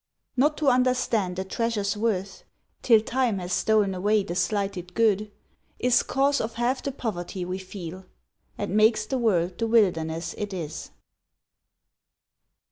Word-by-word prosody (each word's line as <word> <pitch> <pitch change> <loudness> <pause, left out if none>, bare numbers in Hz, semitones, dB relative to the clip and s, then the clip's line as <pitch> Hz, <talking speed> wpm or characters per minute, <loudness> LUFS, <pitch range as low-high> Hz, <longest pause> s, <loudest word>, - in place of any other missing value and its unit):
Not 295 +4 +2
to 300 - -1
understand 250 -7 +1
a 190 - -1
treasure's 205 0 -1
worth 205 -3 -2 0.4
Till 225 -3 +5
time 240 -2 0
has 180 -1 -4
stol'n 210 -1 +2
away 205 +3 +2
the 180 - -5
slighted 180 -1 -2
good, 215 -2 +2 0.5
Is 250 0 +3
cause 275 +2 +1
of 225 +1 -4
half 245 +3 0
the 280 - -3
poverty 185 -7 -4
we 185 +1 -4
feel, 185 -1 -8 0.5
And 205 -1 -3
makes 215 0 +4
the 265 +2 -2
world 180 -6 +1
the 230 - 0
wilderness 165 -7 +1
it 205 -2 -4
is. 160 -3 -6
210 Hz, 140 wpm, -26 LUFS, 185-230 Hz, 0.5 s, Till